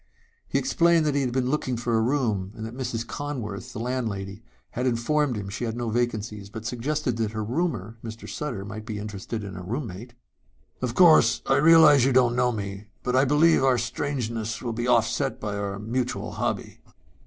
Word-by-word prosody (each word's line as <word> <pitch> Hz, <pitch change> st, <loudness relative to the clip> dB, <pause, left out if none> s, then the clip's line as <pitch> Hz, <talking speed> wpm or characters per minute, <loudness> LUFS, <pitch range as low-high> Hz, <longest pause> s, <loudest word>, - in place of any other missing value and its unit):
He -, -, 0 dB
explained 170 Hz, -9 st, +3 dB
that 150 Hz, -, +1 dB
he 140 Hz, -, +1 dB
had 130 Hz, -2 st, -1 dB
been 130 Hz, 0 st, 0 dB
looking 130 Hz, -5 st, -1 dB
for 120 Hz, 0 st, -1 dB
a 110 Hz, -, +3 dB
room 110 Hz, -7 st, 0 dB
and 110 Hz, -, -6 dB
that 115 Hz, +2 st, -7 dB
Mrs. 120 Hz, -3 st, -3 dB
Conworth, 115 Hz, -9 st, -5 dB
the -, -, -6 dB
landlady, 110 Hz, -5 st, -3 dB, 0.3 s
had 125 Hz, +2 st, -1 dB
informed 130 Hz, +3 st, +1 dB
him 105 Hz, -2 st, -5 dB
she 110 Hz, +5 st, -5 dB
had 115 Hz, 0 st, -3 dB
no 120 Hz, -2 st, -2 dB
vacancies 110 Hz, -4 st, -2 dB
but 110 Hz, +1 st, -8 dB
suggested 125 Hz, +1 st, -1 dB
that 110 Hz, -2 st, -1 dB
her 110 Hz, 0 st, -2 dB
roomer, 120 Hz, -2 st, -2 dB
Mr. 115 Hz, 0 st, -8 dB
Sutter, 120 Hz, -10 st, -4 dB
might 110 Hz, +1 st, -7 dB
be 110 Hz, -, -4 dB
interested 105 Hz, +1 st, -5 dB
in 100 Hz, -1 st, -7 dB
a 90 Hz, -, -6 dB
roommate. 115 Hz, +2 st, -5 dB, 0.7 s
"Of 125 Hz, -2 st, -2 dB
course 155 Hz, -10 st, +6 dB
I 135 Hz, -, +3 dB
realize 155 Hz, -2 st, +7 dB
you 135 Hz, +1 st, +3 dB
don't 120 Hz, -2 st, +4 dB
know 125 Hz, 0 st, +2 dB
me 100 Hz, -1 st, -5 dB, 0.2 s
but 125 Hz, -, 0 dB
I 130 Hz, +2 st, +5 dB
believe 150 Hz, +2 st, +4 dB
our 130 Hz, -2 st, +4 dB
strangeness 115 Hz, -3 st, -3 dB
will 120 Hz, -2 st, -3 dB
be 120 Hz, +2 st, -2 dB
offset 125 Hz, +3 st, +1 dB
by 105 Hz, -1 st, -3 dB
our 100 Hz, -1 st, -3 dB
mutual 120 Hz, +4 st, -2 dB
hobby." -, -, -3 dB
120 Hz, 195 wpm, -25 LUFS, 110-130 Hz, 0.7 s, realize